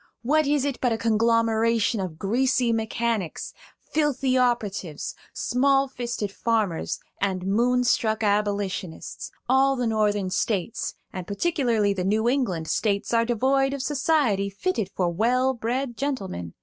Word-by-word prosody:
What 305 +4 +2
is 285 -1 +2
it 280 -3 -2
but 245 - +2
a 225 - +1
conglomeration 230 0 +2
of 180 -5 -4
greasy 240 +4 +1
mechanics, 225 -4 -2 0.4
filthy 275 -4 +1
operatives, 210 - -1 0.2
small 275 +2 +2
fisted 240 -5 -4
farmers, 210 -6 -1 0.2
and 190 -2 -1
moonstruck 235 +1 +2
Abolitionists? 200 -4 -2 0.2
All 270 +2 +4
the 250 -2 -1
Northern 210 -4 +1
States, 200 +2 -1 0.2
and 185 -2 -6
particularly 230 -4 +1
the 185 -2 -3
New 215 +4 +1
England 235 - 0
States, 200 +3 0
are 230 0 +3
devoid 270 +4 +1
of 270 - -4
society 265 -8 +1
fitted 220 - -2
for 180 - -1
well 250 +7 +2
bred 245 +2 -2
gentlemen. 195 - -4
230 Hz, 130 wpm, -25 LUFS, 200-260 Hz, 0.4 s, All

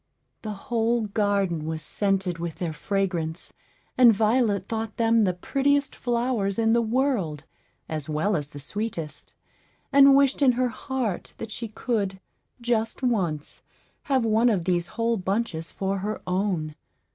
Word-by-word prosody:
The 215 -1 -4 0.2
whole 230 +1 +2
garden 200 -6 0
was 160 -1 -4
scented 190 -1 -1
with 170 -2 -4
their 170 -3 -3
fragrance, 175 -1 -2 0.5
and 245 -2 +9
Violet 215 -2 +2
thought 225 -1 -4
them 230 -1 +4
the 180 - +1
prettiest 280 +8 +1
flowers 235 -5 0
in 225 0 +3
the 235 - +4
world, 225 - 0 0.4
as 155 -2 -4
well 155 +7 +1
as 145 -3 -2
the 145 -1 -10
sweetest, 165 0 -5 0.6
and 275 0 +8
wished 275 0 +3
in 260 -3 +5
her 250 +1 +1
heart 240 -4 -3
that 225 -1 -7
she 230 +2 -4
could, 210 -4 -2 0.4
just 235 0 -1
once, 180 - -1 0.4
have 265 -4 +2
one 225 +2 +4
of 190 -7 0
these 175 -2 +1
whole 230 0 +1
bunches 190 -4 -2
for 195 0 -2
her 210 +3 -3
own. 180 -4 -1
210 Hz, 145 wpm, -25 LUFS, 180-235 Hz, 0.6 s, and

